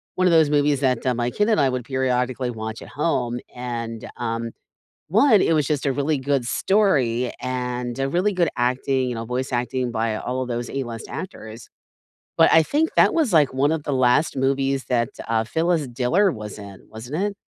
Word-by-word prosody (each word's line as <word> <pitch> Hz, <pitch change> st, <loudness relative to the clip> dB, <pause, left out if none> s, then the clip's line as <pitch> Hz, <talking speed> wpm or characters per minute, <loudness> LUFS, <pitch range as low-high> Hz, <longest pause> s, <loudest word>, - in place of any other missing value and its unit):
one 185 Hz, 0 st, +2 dB
of 180 Hz, -, +4 dB
those 160 Hz, -3 st, +5 dB
movies 145 Hz, -1 st, +2 dB
that, 130 Hz, -3 st, +1 dB
uh, 125 Hz, -, +3 dB
my 120 Hz, 0 st, -1 dB
kid 210 Hz, +2 st, +1 dB
and 215 Hz, -, +3 dB
I 135 Hz, -, +3 dB
would 125 Hz, -2 st, -3 dB
periodically 125 Hz, -1 st, -1 dB
watch 110 Hz, 0 st, -6 dB
at -, -, -11 dB
home, 130 Hz, -6 st, -1 dB, 0.2 s
and, 115 Hz, -2 st, -5 dB
um, 115 Hz, -1 st, -3 dB, 0.6 s
1, 215 Hz, -, +5 dB
it 165 Hz, -, +2 dB
was 150 Hz, -3 st, +2 dB
just 145 Hz, -1 st, -1 dB
a 135 Hz, -, +1 dB
really 145 Hz, +2 st, 0 dB
good 135 Hz, -2 st, 0 dB
story 130 Hz, -, +1 dB
and, 125 Hz, -1 st, -3 dB
uh, 135 Hz, -, 0 dB
really 185 Hz, +6 st, +1 dB
good 175 Hz, -3 st, +2 dB
acting, 130 Hz, +1 st, 0 dB
you 120 Hz, -, -3 dB
know, 115 Hz, -, -5 dB
voice 125 Hz, +3 st, -3 dB
acting 125 Hz, +1 st, -1 dB
by 110 Hz, -1 st, -1 dB
all 130 Hz, +3 st, -3 dB
of -, -, -7 dB
those 120 Hz, 0 st, -3 dB
A-list 120 Hz, -4 st, -5 dB
actors, 110 Hz, -10 st, -8 dB, 0.7 s
but -, -, +6 dB
I 160 Hz, -, +7 dB
think 305 Hz, -, 0 dB
that -, -, +5 dB
was, 295 Hz, -, +1 dB
like, 150 Hz, -4 st, +4 dB
one 135 Hz, +3 st, +2 dB
of 160 Hz, -2 st, -1 dB
the 145 Hz, -, -3 dB
last 130 Hz, +4 st, +2 dB
movies 135 Hz, 0 st, 0 dB
that, 120 Hz, -2 st, 0 dB, 0.2 s
uh, 110 Hz, -1 st, +1 dB
Phyllis 160 Hz, +4 st, 0 dB
Diller 145 Hz, +11 st, +2 dB
was 105 Hz, 0 st, -8 dB
in, 100 Hz, -2 st, -11 dB
wasn't 120 Hz, +10 st, -5 dB
it? 205 Hz, -1 st, -2 dB
130 Hz, 200 wpm, -22 LUFS, 120-150 Hz, 0.7 s, I